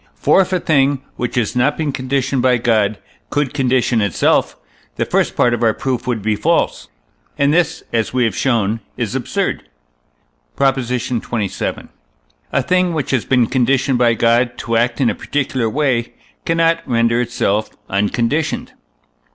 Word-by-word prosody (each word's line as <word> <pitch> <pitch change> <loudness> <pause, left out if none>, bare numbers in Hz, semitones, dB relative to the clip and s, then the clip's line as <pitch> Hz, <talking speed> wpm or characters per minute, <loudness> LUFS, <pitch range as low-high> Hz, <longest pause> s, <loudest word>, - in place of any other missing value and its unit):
For - - +4
if 190 - -2
a 185 - +1
thing, 140 -4 +2
which 125 +2 -3
has 120 -1 0
not 130 +4 +2
been 155 -3 -1
conditioned 135 0 -1
by 125 0 +3
God, 110 -3 +1 0.3
could 145 -3 -1
condition 130 -4 +1
itself, 100 -4 +1 0.4
the - - -1
first - - 0
part 120 - +3
of 120 - -2
our 110 -2 +2
proof 130 -2 -3
would 115 -5 -1
be 110 0 +1
false, - - 0 0.5
and 140 +1 +2
this, 165 -1 +1
as 115 -2 0
we 125 -1 +1
have 110 -5 0
shown 115 -4 0 0.2
is - - -2
absurd. - - -2 0.9
PROP. 135 -1 +2
XXVII. 120 -4 -3 0.6
A 140 - +1
thing, 180 +2 +1
which 150 -4 -2
has 130 -4 0
been 125 -3 +3
conditioned 130 +1 +1
by 120 -1 +3
God 120 +1 +2
to 115 +1 -2
act 120 0 +1
in 130 -4 +3
a - - -3
particular 130 -5 -2
way, 130 -3 0 0.3
cannot 165 0 +2
render 115 -1 +2
itself 110 -3 -1 0.2
unconditioned. 115 +10 -1
125 Hz, 160 wpm, -18 LUFS, 115-140 Hz, 0.9 s, For